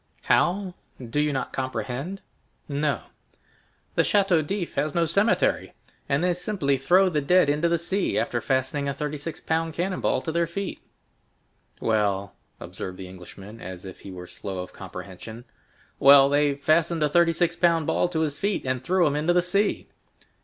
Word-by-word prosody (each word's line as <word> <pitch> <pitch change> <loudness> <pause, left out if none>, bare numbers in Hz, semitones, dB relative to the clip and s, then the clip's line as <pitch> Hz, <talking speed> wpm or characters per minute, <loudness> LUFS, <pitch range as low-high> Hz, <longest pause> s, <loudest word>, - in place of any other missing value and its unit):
"How? 185 +1 +2 0.3
Do 125 +3 -3
you 150 0 +2
not 135 - -3
comprehend?" 135 +7 -4 0.5
"No." 145 0 -1 0.9
"The - - +3
Château 195 -5 +3
d'If 180 +3 -3
has 145 +1 -1
no 170 -1 +3
cemetery, 200 +7 +1 0.4
and 140 +4 +1
they 180 0 +3
simply 180 -6 0
throw 175 +9 +4
the 155 -5 0
dead 180 +2 +4
into 150 +4 +2
the 170 - +2
sea, 185 0 -1
after 120 -3 0
fastening 135 +3 0
a 140 - -3
thirty 150 +1 -3
six 150 +2 -6
pound 160 0 -1
cannon 185 +2 -2
ball - - +1
to 160 - -2
their 170 +1 +1
feet." 195 +3 -5 1.0
"Well?" 100 -3 0 0.3
observed 90 0 -7
the 95 - -8
Englishman 95 +4 -11
as 90 +1 -8
if 95 - -9
he - - -10
were 90 -1 -8
slow 95 +1 -7
of 90 - -13
comprehension. 110 +5 -9 0.5
"Well, 140 0 +8
they 145 0 +2
fastened 155 +3 +2
a - - +4
thirty 170 +3 +4
six 170 +1 +1
pound 165 -3 +2
ball - - +1
to 160 -2 -1
his 150 -2 -1
feet, 200 -6 -1
and 130 -1 -1
threw 185 +3 +2
him 145 -1 +1
into 155 +4 +1
the 175 0 +3
sea." 200 +4 0
150 Hz, 175 wpm, -25 LUFS, 130-175 Hz, 1.0 s, Well